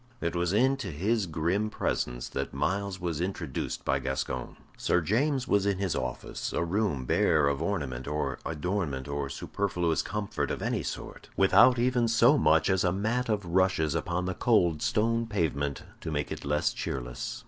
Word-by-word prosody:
It 85 +1 -2
was 85 0 +1
into 130 +2 +2
his 95 +6 0
grim 85 +7 0
presence - - -2
that - - -4
Myles 100 0 -1
was 85 -2 -2
introduced 95 +2 -3
by - - +2
Gascoyne. 65 0 -3 0.2
Sir - - +2
James 130 - +1
was 100 0 +2
in 100 -2 +1
his 95 -4 -1
office, 65 -1 -4
a - - 0
room 85 -7 0
bare 75 +3 +3
of 70 +1 0
ornament 70 -9 -2
or 75 +1 -2
adornment 80 -4 -2
or 70 -1 -3
superfluous 85 +2 -1
comfort 105 0 -3
of - - -2
any - - 0
sort - - -7
without 125 -1 +6
even 120 0 +2
so 115 +5 +5
much 80 - +4
as 95 0 +2
a 90 - +2
mat 110 +6 -1
of 105 -3 0
rushes 85 -3 +2
upon 85 +2 -1
the 95 - -1
cold 85 -7 +2
stone 115 +2 +1
pavement 70 - -1 0.2
to - - -5
make 75 -2 -2
it - - -5
less 75 +1 +1
cheerless. - - -4
90 Hz, 170 wpm, -29 LUFS, 75-105 Hz, 0.2 s, without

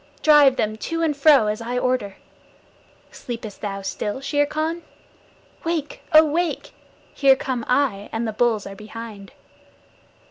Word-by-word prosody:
Drive 295 -4 +6
them 215 -3 -1
to 330 +8 -3
and 310 -3 +1
fro 280 -4 +5
as 210 +2 -2
I 240 +2 -3
order. 250 -6 -1 1.0
Sleepest 230 -4 -8
thou 195 -2 -4
still, 205 +4 -4
Shere 290 +1 0
Khan? 315 +3 -2 0.8
Wake, 325 -3 -3
oh, 310 0 +8
wake! 330 +3 -2 0.4
Here 275 -2 +5
come 260 -3 -3
I, 250 -7 0
and 225 +1 -2
the 220 - -3
bulls 225 -2 +1
are 195 - -8
behind. 215 -1 -10
250 Hz, 140 wpm, -22 LUFS, 215-295 Hz, 1.0 s, oh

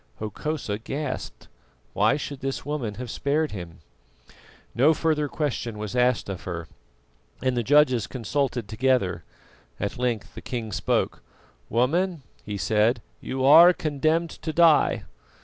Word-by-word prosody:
Hokosa 110 0 -4
gasped. 135 +3 -5 0.5
Why 110 +7 +3
should 140 -2 -6
this 135 0 -4
woman 135 -8 -3
have 120 0 -6
spared 150 +2 0
him? 85 -5 -8 0.9
No 145 +7 +4
further 155 -2 +1
question 135 -7 -3
was 105 +2 -5
asked 125 -1 +2
of 95 -3 -5
her, 85 -3 -5 0.8
and 130 -1 +1
the 120 - +1
judges 130 -2 +4
consulted 125 -1 -2
together. 110 -7 +1 0.6
At 100 +4 -3
length 120 -4 -2
the - - -9
king 115 -4 -5
spoke. - - -1 0.5
"Woman," 160 - +1 0.2
he 105 -1 -5
said, 110 +5 +1 0.2
"you 130 0 -2
are 170 +6 +9
condemned 155 +2 0
to 160 - -5
die. 165 -1 +4
130 Hz, 130 wpm, -25 LUFS, 110-150 Hz, 0.9 s, are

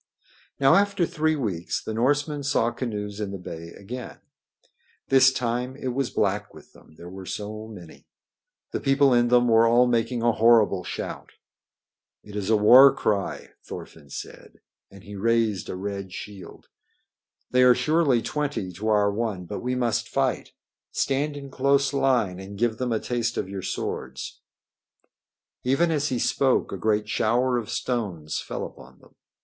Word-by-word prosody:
Now 135 -1 +5
after 200 -3 +3
three 155 0 0
weeks 100 - -2
the 110 - -4
Norsemen 145 +5 0
saw 135 -4 +1
canoes 105 -4 -5
in 105 -2 -3
the 100 - -5
bay 85 -2 -8
again. 120 +5 -8 0.9
This 130 0 +6
time 125 0 -2
it 130 -2 -4
was 130 0 -1
black 105 0 -1
with - - -16
them, 80 - -19
there 85 - -11
were 95 +1 -9
so 110 +1 -5
many. 90 -7 -13 0.6
The - - -2
people 135 -1 +3
in 120 0 +4
them 120 0 +4
were 115 0 +5
all 120 +2 +5
making 115 0 0
a 120 - +4
horrible 110 -5 +4
shout. - - -6 0.9
"It 105 -1 -12
is 105 -1 -3
a 110 - +4
war 125 +6 +8
cry," 100 -2 -2
Thorfinn 75 -3 -10
said, - - -9 0.3
and 100 -1 -15
he 100 +1 -10
raised 110 -2 0
a - - -4
red 100 0 -5
shield. 100 -1 -10 0.8
"They 125 - +4
are 125 -1 +7
surely 155 -7 +2
twenty 145 -11 -3
to 100 +5 -6
our 105 -1 +3
one, 105 -4 -3
but - - -5
we 125 +1 -2
must 120 -3 -1
fight. - - -1 0.4
Stand 145 +2 -1
in 140 -1 -9
close 140 +1 +2
line 125 -9 +1
and 100 +1 -9
give 115 0 0
them 125 -1 -1
a 110 - +1
taste 120 0 -2
of - - -2
your 95 0 -6
swords." - - -5 1.2
Even 150 +7 +2
as 150 -2 0
he 130 - -1
spoke 130 +2 +1
a - - -3
great 105 +2 0
shower 120 +3 +1
of 110 - -8
stones 95 -11 -3
fell - - -5
upon 65 +1 -13
them. - - -22
115 Hz, 165 wpm, -25 LUFS, 100-130 Hz, 1.2 s, war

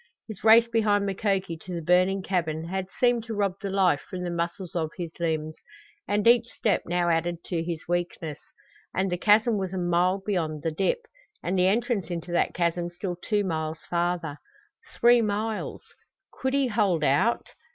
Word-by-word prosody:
His 215 -4 -9
race 225 +1 +7
behind 210 -3 +2
Mukoki 195 -3 -1
to 180 +2 -7
the 170 - -3
burning 185 +3 +3
cabin 165 -3 -2
had 190 0 -2
seemed 240 -2 +3
to 225 -2 -5
rob 200 -2 +1
the 200 - -3
life 190 -6 +2
from 180 -1 -5
the 175 - -3
muscles 170 +1 -4
of 160 -2 0
his 170 -3 -4
limbs, 155 -2 -1 0.5
and 205 +1 0
each 235 0 +5
step 215 -3 0
now 175 0 +1
added 170 +1 0
to 170 -3 -2
his 165 -2 -5
weakness. 175 -3 -2 0.6
And 190 0 0
the 180 - 0
chasm 215 +2 +4
was 190 -1 -3
a - - -2
mile 180 +2 +2
beyond 160 -7 -2
the 165 - 0
dip, 195 - 0 0.4
and 185 - -1
the 180 0 +4
entrance 220 -3 0
into 175 0 -5
that 175 - +1
chasm 170 0 0
still 175 +1 -5
two 205 +4 -1
miles 160 -3 -3
farther. 170 -3 -1 0.6
Three 240 0 +6
miles! 215 +1 -2 0.5
Could 265 +1 -1
he 280 -1 +3
hold 200 -8 +1
out? 145 - +2
180 Hz, 180 wpm, -26 LUFS, 170-205 Hz, 0.6 s, race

